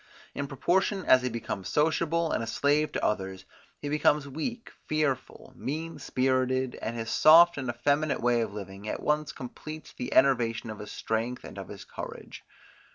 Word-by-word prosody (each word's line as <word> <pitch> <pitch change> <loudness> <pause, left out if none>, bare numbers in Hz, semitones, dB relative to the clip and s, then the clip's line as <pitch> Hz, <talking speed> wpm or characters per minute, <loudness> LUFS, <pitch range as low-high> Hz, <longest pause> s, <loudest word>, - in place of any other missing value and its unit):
In 140 - -3
proportion 185 +8 0
as 130 - +6
he 125 - -1
becomes 110 -5 -4
sociable 160 +2 +1
and - - 0
a - - -5
slave 145 +5 +2
to - - -1
others, 95 -2 -2 0.3
he 145 - -6
becomes 150 0 +2
weak, 230 - -5 0.2
fearful, 140 -3 -2
mean 160 +6 -4
spirited, 130 0 +1
and 115 - -3
his 115 -1 -4
soft 170 +2 +7
and 130 -3 -4
effeminate 145 +6 +1
way 120 -1 +2
of 110 -3 -2
living 100 0 -8
at - - -4
once 150 0 +1
completes 155 +5 -9
the 125 - -5
enervation 120 -4 +3
of 110 - -8
his 105 0 -8
strength 115 +3 -2
and - - -9
of - - -7
his - - -9
courage. - - -8
130 Hz, 170 wpm, -28 LUFS, 115-155 Hz, 0.3 s, soft